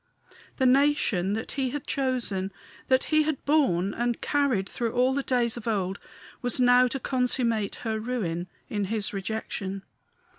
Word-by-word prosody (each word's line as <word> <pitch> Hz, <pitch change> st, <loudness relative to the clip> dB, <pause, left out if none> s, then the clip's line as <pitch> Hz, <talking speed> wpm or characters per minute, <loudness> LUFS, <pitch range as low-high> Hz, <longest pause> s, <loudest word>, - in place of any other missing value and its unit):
The 260 Hz, -, +1 dB
nation 255 Hz, -8 st, +3 dB
that 220 Hz, +1 st, -3 dB
he 270 Hz, -2 st, -1 dB
had 290 Hz, +1 st, -5 dB
chosen 240 Hz, -8 st, -1 dB, 0.4 s
that 260 Hz, 0 st, +3 dB
he 310 Hz, -, +6 dB
had 305 Hz, -2 st, -2 dB
borne 200 Hz, -, +2 dB
and 240 Hz, -1 st, -1 dB
carried 275 Hz, -10 st, +1 dB
through 235 Hz, -1 st, -3 dB
all 255 Hz, +1 st, +3 dB
the 280 Hz, -, 0 dB
days 245 Hz, -3 st, +1 dB
of 235 Hz, -, -7 dB
old 195 Hz, -3 st, -1 dB, 0.4 s
was 245 Hz, 0 st, -1 dB
now 250 Hz, 0 st, +6 dB
to 270 Hz, +2 st, -3 dB
consummate 245 Hz, -5 st, 0 dB
her 220 Hz, -1 st, -1 dB
ruin 195 Hz, -8 st, -2 dB, 0.2 s
in 205 Hz, -2 st, -2 dB
his 210 Hz, +1 st, -2 dB
rejection. 195 Hz, -1 st, -4 dB
240 Hz, 155 wpm, -27 LUFS, 200-260 Hz, 0.4 s, he